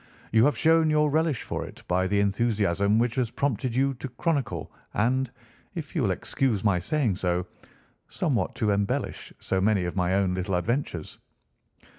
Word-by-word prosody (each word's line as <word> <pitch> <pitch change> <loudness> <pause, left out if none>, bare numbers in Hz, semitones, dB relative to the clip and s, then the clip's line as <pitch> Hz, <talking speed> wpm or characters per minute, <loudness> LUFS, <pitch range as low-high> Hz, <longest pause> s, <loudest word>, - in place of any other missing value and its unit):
You 110 +2 +5
have 145 - +2
shown 160 0 +4
your 150 -1 +3
relish 155 -4 +1
for - - -3
it - - -11
by 90 +1 +1
the 100 +2 +1
enthusiasm 100 -1 +2
which 120 0 +2
has 125 -3 +1
prompted 130 -2 -1
you 135 +1 +2
to 130 +1 -7
chronicle, 125 - -2 0.2
and, 130 +4 +1 0.5
if 160 -2 -6
you 160 - +1
will 110 - +2
excuse 105 +3 -1
my 100 -4 +3
saying 110 - 0
so, 90 -1 0 0.6
somewhat 145 -10 -1
to 110 -4 +1
embellish 100 0 -1
so 95 - -1
many 100 -2 +2
of 90 - -4
my 90 0 +1
own 95 -2 +2
little 95 +1 -1
adventures." 90 - -2
110 Hz, 170 wpm, -26 LUFS, 95-135 Hz, 0.6 s, You